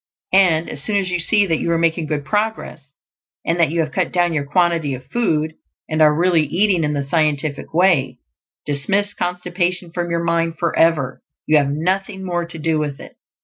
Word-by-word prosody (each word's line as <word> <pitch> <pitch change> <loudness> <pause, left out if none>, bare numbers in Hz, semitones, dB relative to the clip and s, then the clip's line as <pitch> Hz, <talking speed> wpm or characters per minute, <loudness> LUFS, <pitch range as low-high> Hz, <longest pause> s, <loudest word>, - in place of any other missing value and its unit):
And 175 -4 +4
as 140 - -5
soon 210 - -1
as 190 -2 -1
you 180 - 0
see 205 +4 +3
that 165 -4 0
you - - -2
are 165 - +2
making 165 -1 0
good 145 -2 -3
progress, 210 -9 -3 0.5
and 165 +1 0
that 165 -4 +4
you 165 +1 0
have 155 - -3
cut 185 -3 -1
down 175 -1 +1
your 145 -3 -1
quantity 165 -4 +1
of 130 0 -11
food, 160 -10 0 0.3
and 155 0 -1
are 155 -1 +7
really 170 +2 +2
eating 175 +3 +1
in 150 0 0
the 140 -1 -1
Scientific 150 -1 -1
Way, 165 -7 +2 0.5
dismiss 195 +9 0
constipation 180 0 -2
from 175 0 -3
your 170 0 -1
mind 165 -1 0
forever; 160 -5 +1 0.2
you 155 - +4
have 140 -2 +2
nothing 190 +6 -2
more 175 -1 -2
to 170 - -9
do 160 0 0
with 145 -2 -3
it. - - -12
165 Hz, 195 wpm, -19 LUFS, 150-180 Hz, 0.5 s, are